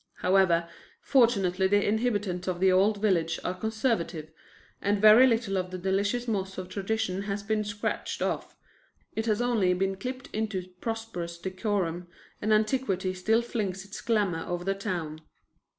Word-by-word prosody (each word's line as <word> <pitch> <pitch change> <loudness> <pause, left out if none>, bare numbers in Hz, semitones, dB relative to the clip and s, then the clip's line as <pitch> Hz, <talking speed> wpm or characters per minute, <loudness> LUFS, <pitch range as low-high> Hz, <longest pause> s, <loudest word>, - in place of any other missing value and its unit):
However, 180 -3 +3 0.3
fortunately 195 -8 +3
the 205 +1 +2
inhabitants 205 -5 0
of 180 -1 -1
the 190 0 +4
old 200 +3 +3
village 175 -6 +1
are 180 - -1
conservative, 215 - -2 0.5
and 200 0 +1
very 215 +5 +8
little 225 -5 +1
of 180 0 -3
the 185 - -5
delicious 200 +6 0
moss 190 -3 -2
of 185 -1 -6
tradition 200 -1 -2
has 200 +1 -2
been 215 +1 0
scratched 205 0 -3
off; - - -2 0.6
it 220 +1 -2
has 215 +2 +1
only 210 -7 +2
been 195 +1 0
clipped 255 +6 -6
into 200 -4 -2
prosperous 225 -7 -4
decorum, 185 -2 -2 0.3
and 215 - 0
antiquity 215 -4 +1
still 220 +6 +1
flings 195 -5 -3
its 200 - -8
glamour 205 -8 0
over 175 0 -3
the 195 +2 0
town. 175 -6 -4
195 Hz, 150 wpm, -28 LUFS, 185-220 Hz, 0.6 s, very